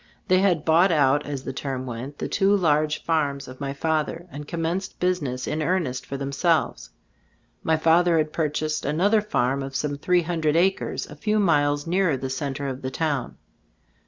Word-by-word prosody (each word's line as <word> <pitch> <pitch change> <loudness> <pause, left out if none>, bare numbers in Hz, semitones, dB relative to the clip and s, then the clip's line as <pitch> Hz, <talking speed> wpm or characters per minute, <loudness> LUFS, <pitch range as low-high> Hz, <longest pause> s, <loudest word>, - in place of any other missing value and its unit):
They 185 0 +5
had 180 -5 +2
"bought 170 +4 +5
out" 145 -2 +3
as 140 -2 -4
the - - -5
term 130 -1 -4
went, 130 +4 -6
the - - -3
two 200 0 +3
large 155 -3 +1
farms 145 -4 0
of 130 0 -11
my 140 -1 -2
father, 160 +3 -1
and 145 +1 -8
commenced 170 +4 -3
business 150 -9 -1
in 155 +1 -2
earnest 155 -7 -1
for 140 - -4
themselves. 140 +5 0 0.7
My 160 0 +1
father 165 +2 +4
had 155 -1 0
purchased 155 -1 -1
another 195 +9 +2
farm 140 - 0
of 135 0 -6
some 145 0 -2
three 180 +2 +2
hundred 160 -2 0
acres, 190 +3 +1
a 150 - -11
few 210 +8 0
miles 145 -7 +2
nearer 175 -4 +1
the 130 0 -4
center 140 +1 -3
of 130 0 -5
the 130 - -3
town. 145 -3 -2
155 Hz, 180 wpm, -24 LUFS, 140-170 Hz, 0.7 s, They